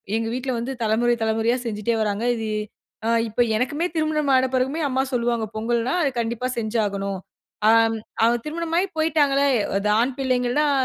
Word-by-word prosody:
எங்க 225 0 -1
வீட்ல 255 +1 -2
வந்து 250 +3 -3
தலமுறை, 235 +2 +2
தலமுறையா 225 +2 +1
செஞ்சுட்டே 225 +1 -1
வராங்க. 210 +1 -1
இது 220 -1 -4 0.6
அ - - +2 0.2
இப்ப 230 +3 0
எனக்குமே 285 +8 0
திருமணம் 305 -2 +1
ஆன 260 0 +4
பெறகுமே 265 +5 0
அம்மா 260 +1 +1
சொல்வாங்க, 235 -2 0
பொங்கல்னா 235 +3 0
அது 275 - +1
கண்டிப்பா 235 +2 -2
செஞ்சாகனும். 200 -4 -1 0.5
ஆம் 225 0 +4 0.3
அ - - +7 0.2
திருமணமாகி 335 +4 -1
போயிட்டாங்களே, 285 -3 +2 0.3
அது 205 +1 -1
ஆண் 250 +2 +1
பிள்ளைங்கள் 250 0 0
தான் 295 -1 +2
240 Hz, 155 wpm, -23 LUFS, 225-275 Hz, 0.6 s, அ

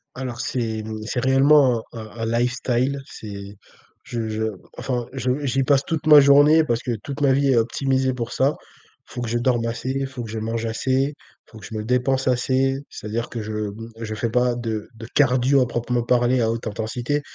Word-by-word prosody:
Alors, 125 -2 -5
c'est, 115 -4 -2
hem, 110 0 -5
c'est 125 - -2
réellement 135 -2 +4
un 115 - -7
un 115 +1 -4
un 115 - +2
lifestyle. 125 +2 0
C'est 100 -3 -9 0.5
je 115 -2 -4
je 110 +1 -2 0.3
enfin, 125 -2 -2
je 130 +2 -1
j'y 135 +1 +1
passe 140 0 +3
toute 160 -1 -3
ma 150 -1 +10
journée, 145 +3 +6
parce 120 -6 -1
que 120 -2 -2
toute 145 +1 -6
ma 140 -2 +4
vie 140 +1 +2
est 120 - +3
optimisée 130 +3 +1
pour 120 -2 -4
ça. 140 +3 +1 0.5
Il - - -13
faut 125 - -4
que 115 - -3
je 120 - 0
dorme 120 -1 +1
assez, 115 +3 -3
il 135 0 -2
faut 130 -2 -7
que 115 - -8
je 110 0 -4
mange 115 +1 -3
assez, 130 +5 0
il - - -22 0.3
faut 110 - -14
que - - -11
je - - -9
me 105 - -3
dépense 130 +2 +1
assez, 130 +2 +1
c'est-à-dire 115 +3 -4
que 115 - -5
je 110 0 -6
m 105 -1 -2 0.3
je 110 -1 -4
fais 115 +2 -1
pas 125 +1 +2
de 110 -3 -4
de 115 0 -9
cardio 130 0 +4
à 125 - +2
proprement 120 0 -1
parler 120 +1 +2
à 115 -1 +2
haute 115 0 -4
intensité, 120 +7 -2
125 Hz, 220 wpm, -22 LUFS, 115-135 Hz, 0.5 s, ma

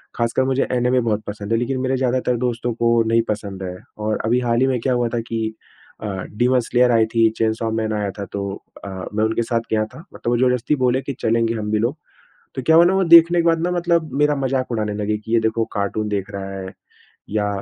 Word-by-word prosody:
खासकर 115 +2 +1
मुझे 130 +1 +1
एनीमे 125 +1 +2
बहुत 110 -2 -1
पसंद 105 +1 -6
है - - +3
लेकिन 130 +2 -2
मेरे 130 0 0
ज़्यादातर 125 -1 0
दोस्तों 120 0 -2
को 115 0 +2
नहीं 115 +1 +3
पसंद 100 -3 -4
है। 90 -1 -5 0.2
और 110 0 -1
अभी 120 +3 +2
हाल 120 -1 +1
ही 130 - +4
में 130 -2 0
क्या 130 +2 +1
हुआ 120 -1 +1
था - - 0
कि 110 -1 -2 0.5
अ, - - -3 0.3
डीमन 125 +2 +3
स्लेयर 125 +1 +2
आई 115 -1 +4
थी, 115 0 +3
चेनसॉ 110 0 0
मैन 110 -1 -1
आया 105 -1 -1
था 100 - -3
तो 100 - -3 0.4
अ, - - -5 0.3
मैं 110 +1 +1
उनके 110 +1 +1
साथ 115 0 -1
गया 110 -1 +2
था। 110 - -13
मतलब - - -4
वो 120 - +2
जबरदस्ती 125 +3 +2
बोले 125 +1 +2
कि 140 - -5
चलेंगे 115 0 +1
हम 105 -1 -3
भी 110 - +2
लोग। 120 +6 0 0.6
तो 130 - -4
क्या 160 - +6
हुआ 170 - +8
ना 180 +2 +3
वो 190 0 +2
देखने 170 0 +7
के - - -1
बाद 165 -1 +3
ना 175 - 0
मतलब 170 -4 0
मेरा 150 0 +3
मज़ाक 130 -1 -1
उड़ाने 105 -2 -1
लगे 105 +1 -1
कि 110 +1 -8
ये 115 - +4
देखो 110 0 0
कार्टून 105 +1 -1
देख 100 -1 -3
रहा 100 -1 -6
है 95 0 -7 0.6
या 105 0 0
115 Hz, 240 wpm, -21 LUFS, 110-130 Hz, 0.6 s, हुआ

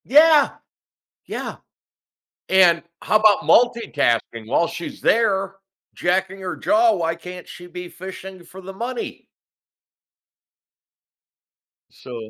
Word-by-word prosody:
Yeah. 305 +2 +5 0.8
Yeah. - - -6 0.9
And 175 -3 +4 0.2
how 215 - +3
about 215 -1 +4
multitasking? 120 - +1
While 170 +8 +1
she's 170 0 -8
there 195 -4 +1 0.4
jacking 190 +2 -1
her 185 -1 -4
jaw, 225 +1 +3
why 165 -3 -1
can't 180 +1 -10
she 175 - -11
be 180 0 -8
fishing 190 0 -10
for 185 +3 -13
the 190 +1 -9
money? 235 +4 -6 2.6
So 115 -4 -10
190 Hz, 105 wpm, -21 LUFS, 170-215 Hz, 2.6 s, Yeah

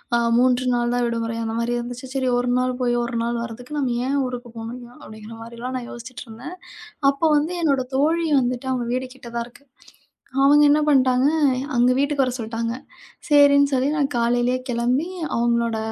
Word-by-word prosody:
ஆ, - - +4 0.2
3 250 0 +3
நாள்தான் 240 0 0
விடுமுறை 230 -1 -3
அந்த 225 0 -3
மாதிரி 235 +1 -1
இருந்துச்சு. 245 +2 -7
சரி, 260 -2 0
1 245 0 0
நாள் 255 0 0
போய், 240 -1 +1
1 235 0 -3 0.3
வரதுக்கு 245 +5 -7
நம்ம 260 -4 0
ஏன் 280 +1 0
ஊருக்குப் 245 -2 -8
போகணும்? 240 +2 -8
அப்படீங்கற 220 -2 -11
மாதிரி 235 +1 -11
எல்லாம் 255 +2 -4
நான் 245 -1 -7
யோசிச்சிட்டிருந்தேன். 240 +5 -9 0.6
அப்போ 280 +4 -2
வந்து 310 +4 -1
என்னோட 275 -4 +2
தோழி 325 +4 +2
வந்துட்டு, 250 +1 -2
அவங்க 245 -2 -2
வீடு 255 +1 -2
கிட்டதான் 235 -2 -5
இருக்கு. 245 +3 -19 0.8
அவங்க 295 +1 +6
என்ன 295 - +4
பண்ணிட்டாங்க, 260 -2 +4 0.5
அங்க 245 +1 +4
வீட்டுக்கு 285 0 +1
வர 255 - -2
சொல்ட்டாங்க. 230 +1 -3 0.6
சரின்னு 285 -1 +5
சொல்லி 260 +1 +2
நான் 280 -2 0
காலையிலே 240 +1 +1
கெளம்பி, 245 +6 0 0.3
அவங்களோட 235 -1 +1
245 Hz, 165 wpm, -22 LUFS, 235-270 Hz, 0.8 s, அவங்க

